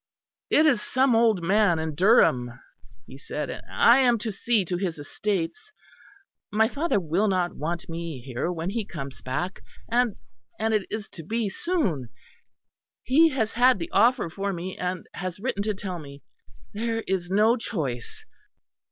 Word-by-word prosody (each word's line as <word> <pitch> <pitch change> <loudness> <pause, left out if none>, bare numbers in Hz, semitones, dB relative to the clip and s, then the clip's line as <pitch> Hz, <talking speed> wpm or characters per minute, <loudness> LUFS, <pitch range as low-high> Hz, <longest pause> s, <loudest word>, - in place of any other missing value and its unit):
"It 310 - +5
is 260 -9 +4
some 260 +1 +2
old 225 -6 +3
man 195 -1 +3
in 160 -1 -3
Durham," 130 - +3 0.5
he 135 - -12
said, 150 +1 -4
"and - - -7
I 240 +3 +5
am 245 -3 +4
to 220 0 -3
see 210 0 +1
to 180 +1 -2
his 175 -3 -2
estates. 200 - -3 0.8
My 220 +2 +3
father 290 -2 0
will 180 +5 0
not 185 -3 0
want 170 +3 -4
me 165 -4 -5
here 130 +6 -3
when 170 +1 -3
he 225 +1 -2
comes 140 -8 -8
back, 175 +9 -3 0.3
and, 240 -3 +2 0.4
and 220 +1 0
it 210 -3 0
is 215 -1 -4
to 165 - -9
be 220 +4 -1
soon. 190 - -1 0.9
He 315 +6 +5
has 240 -7 -1
had 250 +2 +4
the 335 0 -6
offer 240 -4 +3
for 195 +4 -3
me; 185 +1 -5
and 180 -1 -3
has 185 -1 -5
written 210 -2 -2
to 210 0 -1
tell 190 -3 -5
me. 140 -2 -11 0.5
There 225 +1 -2
is 185 -2 -2
no 215 +4 +4
choice." 140 - -5
195 Hz, 165 wpm, -26 LUFS, 165-230 Hz, 0.9 s, It